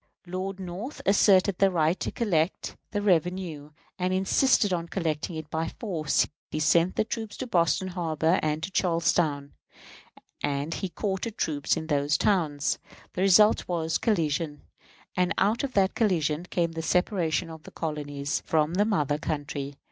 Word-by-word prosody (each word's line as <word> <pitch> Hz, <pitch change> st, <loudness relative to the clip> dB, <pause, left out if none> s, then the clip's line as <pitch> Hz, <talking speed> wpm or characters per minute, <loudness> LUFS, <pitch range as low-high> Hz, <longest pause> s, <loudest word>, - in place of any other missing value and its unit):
Lord 185 Hz, +2 st, -4 dB
North 190 Hz, +9 st, -6 dB
asserted 195 Hz, -1 st, +4 dB
the 195 Hz, -, +5 dB
right 165 Hz, -1 st, +1 dB
to -, -, -2 dB
collect 180 Hz, -7 st, -1 dB
the 205 Hz, -1 st, -2 dB
revenue, 175 Hz, -5 st, 0 dB, 0.3 s
and 180 Hz, 0 st, 0 dB
insisted 195 Hz, +2 st, +3 dB
on 170 Hz, -1 st, -2 dB
collecting 165 Hz, -2 st, -2 dB
it 155 Hz, -1 st, -6 dB
by 160 Hz, +1 st, -1 dB
force. 165 Hz, -9 st, +1 dB, 0.2 s
He 155 Hz, -, -3 dB
sent 170 Hz, +3 st, +3 dB
troops 220 Hz, -3 st, -5 dB
to 260 Hz, -, -4 dB
Boston 185 Hz, -3 st, +1 dB
Harbor 165 Hz, -1 st, +1 dB
and 155 Hz, +1 st, -1 dB
to 185 Hz, -, -3 dB
Charlestown, 165 Hz, -5 st, +1 dB, 0.9 s
and 145 Hz, +2 st, -1 dB
he 190 Hz, -, -3 dB
quartered 200 Hz, +4 st, -3 dB
troops 145 Hz, -1 st, 0 dB
in 160 Hz, -, -4 dB
those 145 Hz, -1 st, +1 dB
towns. 155 Hz, -7 st, +1 dB, 0.3 s
The 180 Hz, -, -3 dB
result 195 Hz, +3 st, +5 dB
was, 165 Hz, -2 st, -1 dB
collision; 160 Hz, -7 st, 0 dB, 0.5 s
and 180 Hz, -1 st, +1 dB
out 215 Hz, +6 st, +2 dB
of 270 Hz, -2 st, -3 dB
that 195 Hz, -1 st, +3 dB
collision 170 Hz, -7 st, +1 dB
came 170 Hz, -2 st, -1 dB
the 165 Hz, 0 st, -4 dB
separation 175 Hz, -1 st, 0 dB
of 160 Hz, -1 st, -10 dB
the -, -, -12 dB
colonies 145 Hz, -2 st, -3 dB
from 155 Hz, 0 st, +2 dB
the 205 Hz, +3 st, +3 dB
mother 150 Hz, -9 st, 0 dB
country. 145 Hz, -2 st, -4 dB
170 Hz, 155 wpm, -27 LUFS, 155-190 Hz, 0.9 s, the